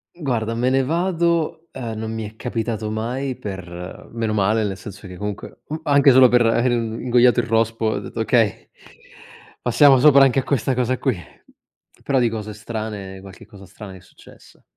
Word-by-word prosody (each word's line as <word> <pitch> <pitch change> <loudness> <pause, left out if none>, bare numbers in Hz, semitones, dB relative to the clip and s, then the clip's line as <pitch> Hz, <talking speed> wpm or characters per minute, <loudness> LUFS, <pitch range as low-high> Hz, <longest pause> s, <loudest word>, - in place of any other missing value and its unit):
Guarda 120 -8 -2
"me 125 +2 +1
ne 135 +1 +2
vado", 170 +1 0
ehm, 115 -4 -6
non 110 0 -4
mi 110 -1 -4
è 110 - -14
capitato 110 -2 -3
mai 125 +5 -3
per 90 -3 -8
meno 115 -2 -2
male 105 +2 +1
nel 100 -2 -3
senso 100 +1 -10
che 90 - -10
comunque, 105 0 -6
mhmm, 155 +1 -5
anche 140 -2 +5
solo 130 0 +7
per 125 0 +3
aver 120 +2 +2
ingoiato 120 +1 +2
il 120 - 0
rospo 115 0 0
ho 110 - -1
detto: 115 - -6
"Okay, 115 -3 +1 0.9
passiamo 135 +2 +5
sopra 140 0 +7
anche 135 0 +3
a - - -2
questa 135 -1 0
cosa 125 0 0
qui". 130 -3 0 0.9
Però 135 -2 +1
di 120 -2 +2
cose 110 -1 -6
strane 105 -3 -6
qualche 95 -2 -13
cosa 100 -2 -14
strana 100 +2 -11
mi 95 - -11
è - - -21
successa. 90 - -19
115 Hz, 185 wpm, -21 LUFS, 105-130 Hz, 0.9 s, solo